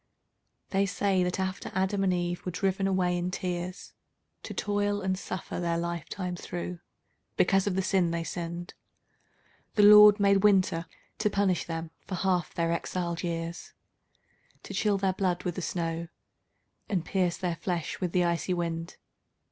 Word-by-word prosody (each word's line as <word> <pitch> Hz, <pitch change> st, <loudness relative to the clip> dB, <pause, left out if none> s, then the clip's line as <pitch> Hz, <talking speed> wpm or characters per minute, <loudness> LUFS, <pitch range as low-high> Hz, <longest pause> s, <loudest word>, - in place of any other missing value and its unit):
They 195 Hz, 0 st, +2 dB
say 195 Hz, -1 st, +1 dB
that 180 Hz, +1 st, -1 dB
after 190 Hz, 0 st, -3 dB
Adam 190 Hz, +1 st, +1 dB
and 190 Hz, -, +3 dB
Eve 175 Hz, -1 st, -1 dB
were 180 Hz, -, -3 dB
driven 195 Hz, +2 st, 0 dB
away 185 Hz, -2 st, +1 dB
in 175 Hz, +1 st, -1 dB
tears 180 Hz, 0 st, -4 dB, 0.5 s
To -, -, -8 dB
toil 205 Hz, 0 st, 0 dB
and 190 Hz, -1 st, 0 dB
suffer 185 Hz, -2 st, -5 dB
their 170 Hz, -1 st, 0 dB
life 170 Hz, -1 st, -3 dB
time 180 Hz, -2 st, -3 dB
through, 175 Hz, 0 st, -5 dB, 0.6 s
because 195 Hz, -1 st, +3 dB
of 190 Hz, -, 0 dB
the 190 Hz, -, +1 dB
sin 185 Hz, -2 st, +2 dB
they 170 Hz, 0 st, -2 dB
sinned, 170 Hz, +1 st, -5 dB, 1.0 s
The 210 Hz, -, +5 dB
Lord 210 Hz, 0 st, +9 dB
made 200 Hz, -1 st, +4 dB
Winter 185 Hz, -5 st, +3 dB, 0.3 s
to 215 Hz, -1 st, +2 dB
punish 195 Hz, -3 st, +1 dB
them 165 Hz, -1 st, -5 dB, 0.2 s
for 190 Hz, -, -3 dB
half 180 Hz, -2 st, 0 dB
their 165 Hz, 0 st, +1 dB
exiled 170 Hz, 0 st, -2 dB
years, 170 Hz, -1 st, -4 dB, 0.9 s
To -, -, -8 dB
chill 205 Hz, +1 st, +2 dB
their 190 Hz, -1 st, +1 dB
blood 180 Hz, -2 st, -1 dB
with 180 Hz, -, -1 dB
the 185 Hz, -, -5 dB
snow, 170 Hz, -1 st, -2 dB, 0.8 s
and 180 Hz, -5 st, 0 dB
pierce 180 Hz, -2 st, 0 dB
their 175 Hz, -2 st, -2 dB
flesh 170 Hz, -1 st, -3 dB
with 180 Hz, -2 st, -1 dB
the 180 Hz, 0 st, +3 dB
icy 170 Hz, +1 st, 0 dB
wind. 170 Hz, 0 st, -3 dB
180 Hz, 165 wpm, -29 LUFS, 170-195 Hz, 1.0 s, Lord